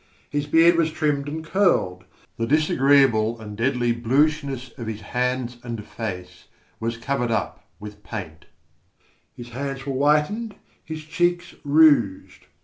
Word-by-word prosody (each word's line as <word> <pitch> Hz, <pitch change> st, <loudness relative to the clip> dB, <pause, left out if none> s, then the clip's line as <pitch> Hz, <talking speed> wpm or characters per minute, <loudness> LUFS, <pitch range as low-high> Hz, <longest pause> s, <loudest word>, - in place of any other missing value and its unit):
His 145 Hz, 0 st, -2 dB
beard 165 Hz, +3 st, +5 dB
was 165 Hz, -1 st, +2 dB
trimmed 145 Hz, -3 st, -1 dB
and 160 Hz, +2 st, -6 dB
curled. 165 Hz, -, +1 dB, 0.3 s
The 115 Hz, -, -1 dB
disagreeable 135 Hz, -6 st, +3 dB
and 105 Hz, -2 st, -8 dB
deadly 120 Hz, +1 st, +1 dB
bluishness 135 Hz, +1 st, 0 dB
of 115 Hz, -, -5 dB
his 110 Hz, -1 st, -5 dB
hands 125 Hz, 0 st, -2 dB
and 115 Hz, -4 st, -6 dB
face 90 Hz, -5 st, -7 dB, 0.3 s
was 115 Hz, +1 st, -3 dB
covered 125 Hz, 0 st, -2 dB
up 110 Hz, -3 st, -3 dB
with 105 Hz, 0 st, -10 dB
paint; 80 Hz, 0 st, -8 dB, 0.9 s
his 120 Hz, 0 st, -9 dB
hands 135 Hz, +2 st, -5 dB
were 140 Hz, -, -2 dB
whitened, 150 Hz, -, +1 dB, 0.3 s
his 155 Hz, -1 st, -7 dB
cheeks 175 Hz, +3 st, -1 dB
rouged. 145 Hz, -9 st, +3 dB
135 Hz, 135 wpm, -23 LUFS, 115-150 Hz, 0.9 s, beard